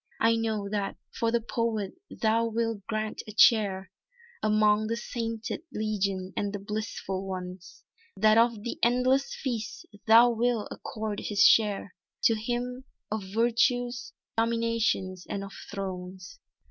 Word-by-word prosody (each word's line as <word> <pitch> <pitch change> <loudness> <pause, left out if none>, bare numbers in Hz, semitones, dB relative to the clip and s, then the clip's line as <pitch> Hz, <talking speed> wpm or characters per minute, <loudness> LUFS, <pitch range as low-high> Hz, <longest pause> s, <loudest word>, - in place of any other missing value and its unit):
"I 230 0 +4
know 220 -3 -1
that 200 -1 -2 0.2
for 230 0 0
the 235 0 +2
poet 225 -3 -1 0.2
thou 225 +1 +1
wilt 225 -2 -2
grant 215 -1 -2
a - - -6
chair, 200 -4 +4 0.5
Among 215 0 +3
the 230 +1 -1
Sainted 230 0 -4
Legion 200 -3 -2
and 205 -1 -1
the 205 - -3
Blissful 200 -2 -4
ones, 185 -1 -7 0.3
That 215 0 +5
of 230 -2 +3
the 235 - -4
endless 250 +3 +2
feast 235 -5 -4 0.2
thou 230 +2 +8
wilt 235 -1 0
accord 215 -2 -4
his 205 -1 +2
share 205 -3 +4 0.3
To 230 - +5
him, 245 +3 -3 0.3
of 215 0 -1
Virtues, 240 +3 +1 0.2
Dominations 225 -5 0
and 195 - -3
of 195 - -9 0.2
Thrones." 185 -2 -6
220 Hz, 135 wpm, -28 LUFS, 200-230 Hz, 0.5 s, thou